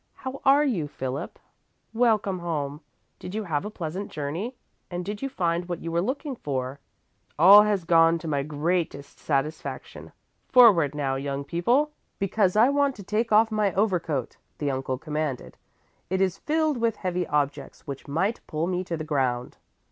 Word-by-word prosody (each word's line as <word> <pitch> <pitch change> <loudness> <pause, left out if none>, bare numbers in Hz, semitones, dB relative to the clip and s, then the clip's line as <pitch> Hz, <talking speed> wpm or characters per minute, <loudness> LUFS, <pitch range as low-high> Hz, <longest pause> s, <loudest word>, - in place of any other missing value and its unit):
How 260 +1 -7
are 275 +2 +6
you, 205 - 0
Philip? 135 +3 -5 0.6
Welcome 220 -5 +2
home! 150 -4 -3 0.4
Did 180 - -7
you 220 - -2
have 155 -5 -2
a - - -3
pleasant 185 0 -5
journey 165 - -4 0.3
and 175 0 -4
did 205 +1 -5
you 275 - -2
find 175 -5 -1
what 175 - -4
you 165 - -4
were 170 +1 +1
looking 270 - -3
for?" 135 - -4 0.6
"All 195 +6 +9
has 210 -3 +1
gone 165 0 +5
to 165 - -8
my 145 -2 0
greatest 150 0 -2
satisfaction. 150 +2 -3 0.4
Forward 190 - +6
now, 135 -2 -1
young 140 0 -3
people, 240 - +1 0.3
because 195 -1 +1
I 220 +3 +6
want 280 -1 +2
to 205 - -10
take 215 +4 -1
off 220 +1 +5
my 210 -3 +1
overcoat," 175 - 0 0.2
the 145 -2 -1
uncle 130 -1 -2
commanded. 150 -2 -4 0.5
"It 190 +1 0
is 190 -1 +1
filled 310 -2 0
with 230 -2 +1
heavy 180 -3 -2
objects 145 -1 -2
which 140 -1 -7
might 190 +10 0
pull 155 +1 -2
me 180 0 -1
to 170 -2 -3
the 155 - -4
ground." 130 -5 -1
175 Hz, 170 wpm, -26 LUFS, 150-215 Hz, 0.6 s, All